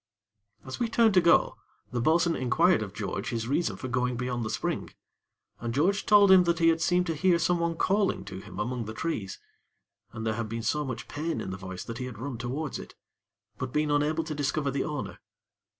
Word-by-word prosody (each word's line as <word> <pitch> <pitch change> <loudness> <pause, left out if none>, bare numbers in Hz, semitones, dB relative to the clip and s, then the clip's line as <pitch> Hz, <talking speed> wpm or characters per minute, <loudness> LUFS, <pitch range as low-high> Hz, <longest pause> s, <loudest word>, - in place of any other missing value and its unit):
As 130 - -6
we 235 - 0
turned 230 -2 +4
to 185 - +6
go, 170 0 +4 0.3
the 120 -1 -1
bo'sun 165 +4 +3
inquired 165 +6 +3
of 105 -3 -4
George 100 -1 -4
his 115 -1 -3
reason 155 +6 0
for 130 - -5
going 125 0 0
beyond 125 -1 -2
the 110 - -3
spring, - - -2 0.7
and 115 0 -4
George 190 +8 +1
told 205 -2 +7
him 185 -1 +7
that 170 -1 +2
he 165 0 +4
had 165 0 +1
seemed 180 +1 +2
to 165 - -1
hear 170 +3 +3
someone 170 0 +1
calling 195 +4 +1
to 95 - -7
him - - -10
among 120 +1 -2
the 110 +1 -7
trees, 105 - -3 0.7
and 110 0 -6
there 110 - +1
had 115 0 -4
been 115 0 -4
so 150 +6 0
much 125 -4 -5
pain 160 +3 -3
in 95 - -4
the - - -4
voice 95 -1 -7
that 115 0 -7
he 125 - -3
had 125 -4 -7
run 130 0 -5
towards 135 +5 -3
it; - - -11 0.6
but 130 -1 -3
been 150 +1 +1
unable 150 +3 +1
to 155 -1 -5
discover 145 0 -1
the 135 0 -1
owner. 150 -3 -5
140 Hz, 215 wpm, -28 LUFS, 115-170 Hz, 0.7 s, told